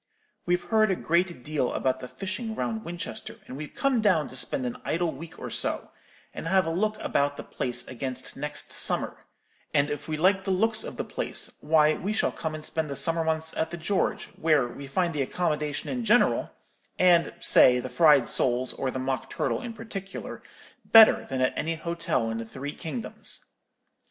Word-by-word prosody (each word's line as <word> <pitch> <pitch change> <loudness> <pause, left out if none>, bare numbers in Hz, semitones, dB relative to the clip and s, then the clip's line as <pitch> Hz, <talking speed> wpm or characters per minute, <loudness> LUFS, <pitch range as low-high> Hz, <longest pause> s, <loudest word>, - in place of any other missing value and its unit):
We've 175 0 +1
heard 215 -1 +3
a 190 - +2
great 170 -5 0
deal 150 -4 -1
about 130 0 0
the 125 - -7
fishing 205 - -5
round 220 -1 -3
Winchester; 170 0 -6
and 130 - -9
we've 150 +1 -8
come 270 -4 +1
down 175 -9 +2
to - - -9
spend 130 0 +1
an 120 - -4
idle 170 0 0
week 160 +3 -10
or - - -7
so, - - -1 0.4
and - - -6
have 190 +2 +3
a 165 - -1
look 215 +5 0
about 145 0 0
the - - -6
place 125 -2 -3
against 130 0 -5
next 150 +1 -4
summer; - - +2 0.5
and 145 +1 +3
if 145 0 -5
we 155 -1 -2
like 190 +4 +3
the 195 - -4
looks 220 +4 +2
of - - -7
the - - -2
place, - - -1
why, 155 0 +4
we 200 +6 -3
shall - - +1
come 160 -1 -4
and 155 - -5
spend 160 -2 -2
the 140 - -4
summer 165 +2 0
months 160 0 -1
at 160 - -1
the 175 - -6
George, 185 +4 -1
where 155 -6 +3
we 140 +3 -9
find 170 +5 0
the 145 - -1
accommodation 150 0 -2
in 250 -2 -3
general, 230 +2 +3 0.5
and 175 -2 +4
say 125 0 +6
the 125 - -4
fried 140 0 +5
soles, 125 +1 +1
or 135 - -2
the 130 - -4
mock 130 0 -3
turtle, - - -1
in 245 -2 -5
particular, 215 -4 -7 0.4
better 225 -1 +7
than 130 -1 -2
at 130 - +2
any 165 +1 -1
hotel 165 -8 -1
in 115 - -3
the 115 - -5
three 135 +5 -6
kingdoms. 135 -8 -4
160 Hz, 195 wpm, -27 LUFS, 135-185 Hz, 0.5 s, better